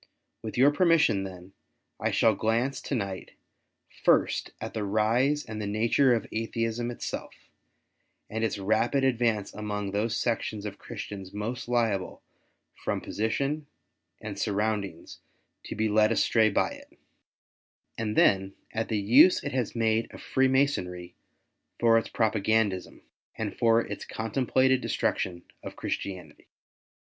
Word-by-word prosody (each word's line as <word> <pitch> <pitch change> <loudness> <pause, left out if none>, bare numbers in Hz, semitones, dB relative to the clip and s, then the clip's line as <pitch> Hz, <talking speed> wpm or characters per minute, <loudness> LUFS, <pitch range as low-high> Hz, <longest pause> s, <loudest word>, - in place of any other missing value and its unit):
With 110 +1 -6
your 135 +4 +6
permission 165 - +3
then, 95 0 -10 0.5
I - - 0
shall 115 - +3
glance 115 +6 0
to 140 - -3
night, 100 -5 -4 0.7
first, - - +3
at - - -6
the 110 - -2
rise 115 +8 +1
and 110 -1 -6
the 105 - -3
nature 115 +5 +3
of 115 - -3
Atheism 115 +1 -2
itselfi* 120 - -5 1.0
and 110 +1 -3
its 110 - 0
rapid 110 +7 +1
advance 120 -5 +1
amongst 105 -2 -4
those 110 +3 0
sections 110 -3 -2
of 105 - -6
Christians 100 -4 -8
most 115 +4 -4
liable 115 -6 -1 0.5
from - - -3
position 140 +8 -2 0.5
and 105 -3 -7
surroundings 105 -4 -2 0.5
to - - -6
be 110 +1 +1
led 110 +1 +3
astray 110 0 +3
by 100 - +1
it; - - -13 1.0
and 110 -1 -3
then 95 0 +3 0.2
at 115 0 -1
the 110 - -1
use 120 - +6
it 145 - -3
has 125 -3 -2
made 115 0 +1
of - - -11
Free 135 0 +1
masonry 90 -11 0 0.7
for 115 -1 +5
its - - -7
propagandism, 110 -3 0 0.3
and - - -4
for 115 0 +4
its - - -6
contemplated 130 +3 +1
destruc - - 0
tion 90 -2 -4 0.2
of - - -8
Christianity. 90 -6 -5
110 Hz, 135 wpm, -28 LUFS, 100-120 Hz, 1.0 s, your